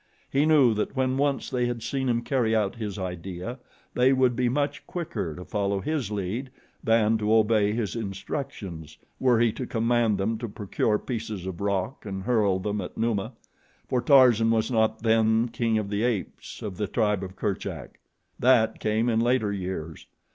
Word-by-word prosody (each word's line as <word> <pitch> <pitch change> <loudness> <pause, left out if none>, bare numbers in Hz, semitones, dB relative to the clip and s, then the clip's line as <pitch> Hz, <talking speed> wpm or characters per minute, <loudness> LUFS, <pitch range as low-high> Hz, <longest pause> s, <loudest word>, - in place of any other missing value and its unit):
He 140 +3 +3
knew 140 -7 +5
that 105 +5 -2
when 130 -1 +1
once 140 0 0
they 125 -1 +1
had 120 -2 -4
seen 130 +2 -1
him 120 0 +1
carry 120 -5 +1
out 105 0 0
his 105 -4 -4
idea 95 +5 -5 0.3
they 130 +2 +4
would 130 -2 +3
be 125 0 +1
much 145 +3 -2
quicker 165 - -4
to 90 - -9
follow 100 -1 -1
his 145 -2 -2
lead 105 +6 -3 0.3
than 115 -1 +3
to 105 0 0
obey 110 -2 +3
his 110 -3 -2
instructions, 95 - -5 0.2
were 125 -3 +3
he 120 -1 +3
to 125 +3 -6
command 115 -2 +1
them 110 +3 -1
to 120 -1 -4
procure 105 +1 0
pieces 110 -6 -5
of 95 -2 -6
rock 100 +6 -2
and 95 -2 -5
hurl 105 -5 +2
them 105 +2 -2
at 90 - -8
Numa, 115 0 -1 0.5
for 125 - 0
Tarzan 120 -4 +6
was 115 +1 +1
not 110 -1 +1
then 110 +1 +3
king 115 -1 0
of 105 -2 -3
the 105 +1 0
apes 115 -5 -3
of 100 -4 -5
the 105 -1 -1
tribe 105 -2 +1
of 95 -1 -7
Kerchak. 100 0 -4 0.4
That 120 -3 +4
came 110 +2 0
in 115 -2 +2
later 120 -3 +1
years. 90 -5 -5
110 Hz, 180 wpm, -26 LUFS, 100-120 Hz, 0.5 s, Tarzan